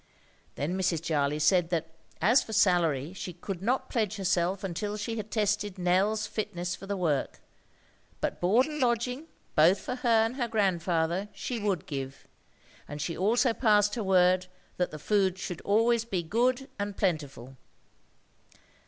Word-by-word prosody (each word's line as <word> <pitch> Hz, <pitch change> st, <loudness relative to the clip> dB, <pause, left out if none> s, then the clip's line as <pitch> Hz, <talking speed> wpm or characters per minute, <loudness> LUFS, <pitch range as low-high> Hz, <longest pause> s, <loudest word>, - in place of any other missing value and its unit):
Then 155 Hz, +6 st, -2 dB
Mrs. 185 Hz, -3 st, 0 dB
Jarley 150 Hz, -2 st, 0 dB
said 175 Hz, +2 st, +3 dB
that 165 Hz, -2 st, -2 dB, 0.3 s
as 235 Hz, +8 st, +5 dB
for 220 Hz, -, -7 dB
salary 170 Hz, -7 st, +2 dB
she 185 Hz, -1 st, -6 dB
could 180 Hz, +1 st, -6 dB
not 245 Hz, +6 st, 0 dB
pledge 215 Hz, -4 st, -1 dB
herself 185 Hz, -1 st, 0 dB
until 205 Hz, +3 st, -3 dB
she 225 Hz, +2 st, -4 dB
had 215 Hz, -1 st, -5 dB
tested 210 Hz, -2 st, -1 dB
Nell's 190 Hz, +4 st, +1 dB
fitness 180 Hz, -4 st, -3 dB
for 195 Hz, -, -11 dB
the 200 Hz, 0 st, -2 dB
work. 155 Hz, -7 st, -1 dB, 0.8 s
But -, -, -3 dB
board 215 Hz, +9 st, +4 dB
and 300 Hz, -1 st, -5 dB
lodging, 250 Hz, +4 st, 0 dB, 0.3 s
both 170 Hz, +6 st, +5 dB
for 250 Hz, -, -5 dB
her 250 Hz, -1 st, -1 dB, 0.2 s
and 235 Hz, +4 st, -4 dB
her 240 Hz, -3 st, 0 dB
grandfather, 185 Hz, -3 st, 0 dB
she 245 Hz, -2 st, -4 dB
would 200 Hz, -6 st, -1 dB
give; 135 Hz, -2 st, -6 dB, 0.6 s
and 145 Hz, +1 st, -7 dB
she 165 Hz, +3 st, -3 dB
also 230 Hz, +5 st, +2 dB
passed 210 Hz, -3 st, +3 dB
her 225 Hz, -, -2 dB
word 185 Hz, -1 st, +3 dB, 0.3 s
that 180 Hz, -, 0 dB
the 155 Hz, -, -8 dB
food 190 Hz, +2 st, +1 dB
should 180 Hz, -3 st, -5 dB
be -, -, -17 dB
always 225 Hz, +3 st, +3 dB
good 235 Hz, +7 st, 0 dB
and 205 Hz, -1 st, -3 dB
plentiful. 145 Hz, -, -2 dB
195 Hz, 160 wpm, -28 LUFS, 175-220 Hz, 0.8 s, as